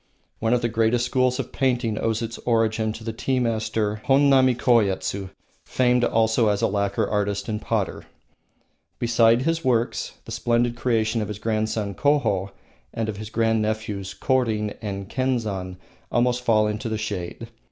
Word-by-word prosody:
One 115 +2 +2
of 120 - -1
the - - +3
greatest 115 +1 +1
schools 125 0 +1
of 130 - -4
painting 120 -5 0
owes 115 0 -1
its 115 +1 -5
origin 110 -2 +1
to 110 - -10
the 115 0 -4
tea 130 +3 -1
master 110 -2 -1
Honnami 135 -2 +5
Koyetsu, 100 -5 +1 0.3
famed 125 -1 +2
also 110 0 +2
as 105 -1 +1
a - - +4
lacquer 100 0 0
artist 100 -1 -1
and 105 -2 -3
potter. - - -2 0.9
Beside 115 0 +3
his 165 +2 0
works, 120 -3 0
the - - -9
splendid 120 0 +1
creation 115 -2 0
of 105 - -2
his 105 - -5
grandson, 110 -2 -1
Koho, 115 -10 +1 0.4
and 115 -1 -3
of 105 - -4
his 110 0 -7
grand 115 0 +1
nephews, 105 -2 -3
Korin 110 -6 0
and 100 -2 -5
Kenzan, 110 -9 -2 0.3
almost 120 +1 +2
fall 110 -3 +3
into 105 +2 -2
the 110 - -2
shade. 105 +1 -5
115 Hz, 160 wpm, -24 LUFS, 105-120 Hz, 0.9 s, Honnami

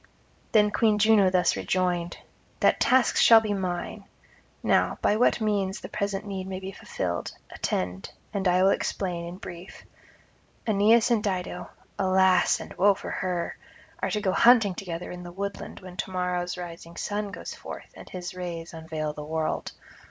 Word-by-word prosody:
Then 210 -2 +4
Queen 215 0 +3
Juno 210 -2 +5
thus 180 -1 +2
rejoined: 175 -2 -1 0.4
'That - - +3
task 260 -2 +3
shall 225 -1 +8
be 215 -2 -2
mine. 190 +2 -3 0.6
Now, - - +2
by 210 - +2
what 240 +2 +3
means 205 -3 0
the - - -8
present 200 0 -2
need 190 -2 -5
may 190 -1 -4
be 190 0 -6
fulfilled, 85 - -4 0.2
attend 90 +1 -3 0.2
and 195 -2 0
I 180 +1 +4
will 195 - +5
explain 175 -4 -2
in 175 +1 -7
brief. 180 -1 -10 0.8
Aeneas 220 +2 +4
and 220 -3 +2
Dido 180 -3 -3 0.3
(alas 190 -1 +4
and - - -8
woe 200 +1 +5
for - - -7
her!) 180 -2 -2 0.5
are - - 0
to 210 - -1
go 190 -2 +1
hunting 225 -2 +5
together 180 -2 -6
in 180 0 -7
the 175 0 -8
woodland 200 +2 -6
when 185 -1 -11
to - - -3
morrow's 180 -1 -2
rising 170 -1 -8
sun 205 0 -2
goes 200 - -7
forth - - -9
and - - -12
his 180 -1 -6
rays 170 -2 -6
unveil 160 -2 -4
the 150 - -7
world. 160 +1 -2
185 Hz, 165 wpm, -27 LUFS, 175-205 Hz, 0.8 s, shall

